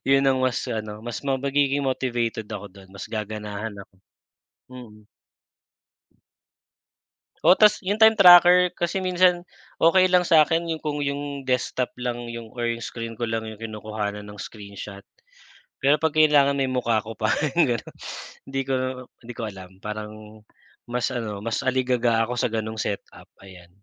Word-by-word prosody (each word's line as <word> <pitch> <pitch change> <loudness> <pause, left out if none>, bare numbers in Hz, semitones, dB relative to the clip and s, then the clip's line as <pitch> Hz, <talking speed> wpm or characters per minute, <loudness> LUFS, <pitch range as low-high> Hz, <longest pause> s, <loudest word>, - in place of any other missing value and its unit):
'Yon 135 0 +4
ang 130 -1 +2
mas 130 -1 0
ano, 110 0 -5
mas 120 -2 -5
ma 135 -1 -1
magiging 140 +1 0
motivated 120 -4 -2
ako 105 -3 -7
do'n. 95 -1 -16
Mas 95 -1 -9
gaganahan 105 0 -5
ako. - - -38 0.8
Mm. 120 -4 -12 2.4
Oh - - +7
tas 210 -1 +5
yung 200 +1 -1
time 220 -1 +5
tracker, 180 0 +8
kasi 175 +2 -1
minsan 180 -1 +2 0.3
okey 185 +2 +4
lang 180 -1 +4
sa'kin 165 +1 +4
yung 160 -1 -4
kung 150 -1 -2
yung 140 -1 -4
desktop 125 0 0
lang 120 -1 -4
yung, 115 -1 -8
or 120 -1 -3 0.2
screen 115 -1 -6
ko 120 - -5
lang 110 -1 -2
yung 110 - -7
kinukuhanan 105 -1 -5
ng 105 - -10
screenshot. 100 -1 -9 0.8
Pero 145 +2 +4
'pag 160 -1 0
kailangan 150 -3 +5
may 135 -1 0
mukha 120 -4 0
ko 110 0 -9
pa, 110 -1 +1 0.2
yung 125 -8 +4
gano'n - - -12 0.5
'di 135 0 -3
ko 135 0 -1 0.5
'di 120 - -6
ko - - -6
alam. 95 -2 -11
Parang, 105 0 -8 0.5
mas 125 +1 -2
ano, 110 -5 -4
mas 115 +3 -2
aligaga 125 -3 +2
ako 125 +1 -4
sa - - +2
gano'ng 110 0 -4
setup 100 -2 -5 0.2
ayan. 90 -3 -14
120 Hz, 155 wpm, -24 LUFS, 110-145 Hz, 2.4 s, tracker